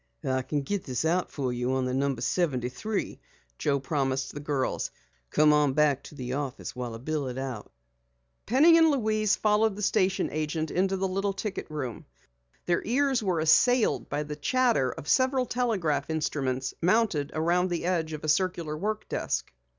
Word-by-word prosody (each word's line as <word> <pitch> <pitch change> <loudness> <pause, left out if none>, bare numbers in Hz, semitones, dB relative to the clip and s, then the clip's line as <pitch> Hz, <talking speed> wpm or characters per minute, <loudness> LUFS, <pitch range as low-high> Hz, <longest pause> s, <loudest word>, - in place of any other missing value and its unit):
"I 130 0 +1
can 145 +2 -2
get 200 +6 -2
this 130 +2 -2
out 175 +3 +1
for 130 -4 -2
you 125 +1 -1
on 130 -1 0
No. 140 -1 +1
73," 135 - -2 0.4
Joe 140 -2 +1
promised 135 -1 -1
the - - -6
girls. 145 -3 -1 0.4
"Come 150 0 +4
on 150 -2 +3
back 145 -2 +3
to - - -11
the 125 -2 -5
office 135 -2 -4
while 120 -2 -5
I - - -6
bill 145 +3 -3
it 125 0 -5
out." 130 -5 -5 0.8
Penny 315 +8 +6
and 325 -1 +6
Louise 215 -6 +2
followed 215 0 +2
the 210 - -5
station 195 -1 +1
agent 155 +1 -2
into 190 +2 +1
the 190 +1 0
little 195 +1 -1
ticket 195 -2 -5
room. 130 -7 -5 0.6
Their 175 -1 +1
ears 265 +2 +1
were 185 -6 0
assailed 245 +9 +3
by 145 +1 -1
the 150 0 -6
chatter 225 - +2
of 145 - -9
several 260 - +3
telegraph 195 - -1
instruments 135 -5 -1
mounted 180 -6 +2
around 175 +3 +2
the 170 -1 -2
edge 165 -3 0
of 155 - -6
a - - -3
circular 170 -2 0
work 210 +6 -3
desk. - - -2
155 Hz, 175 wpm, -28 LUFS, 140-205 Hz, 0.8 s, Penny